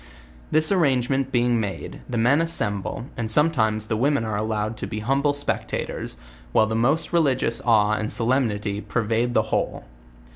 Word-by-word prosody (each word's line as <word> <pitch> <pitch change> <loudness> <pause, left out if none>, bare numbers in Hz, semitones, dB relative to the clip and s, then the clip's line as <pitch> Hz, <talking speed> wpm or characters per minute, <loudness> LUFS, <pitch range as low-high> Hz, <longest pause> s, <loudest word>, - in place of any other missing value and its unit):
This 155 +2 +3
arrangement 135 -6 +1
being 120 -1 +2
made, 100 -5 -5
the 120 - -2
men 125 +7 +3
assemble, 105 -9 -1
and 115 -2 -3
sometimes 110 -6 +2
the 110 - -2
women 135 +1 +1
are 110 -1 -2
allowed 110 +1 -2
to - - -5
be 110 -1 -5
humble 135 +5 +1
spectators, 145 - -3 0.4
while 110 - +5
the 110 +1 -2
most 140 +9 +1
religious 130 -8 +1
awe 105 -3 +4
and 110 0 -1
solemnity 110 -4 0
pervade 115 +2 -1
the 110 - +4
whole. - - -1
115 Hz, 155 wpm, -23 LUFS, 110-135 Hz, 0.4 s, while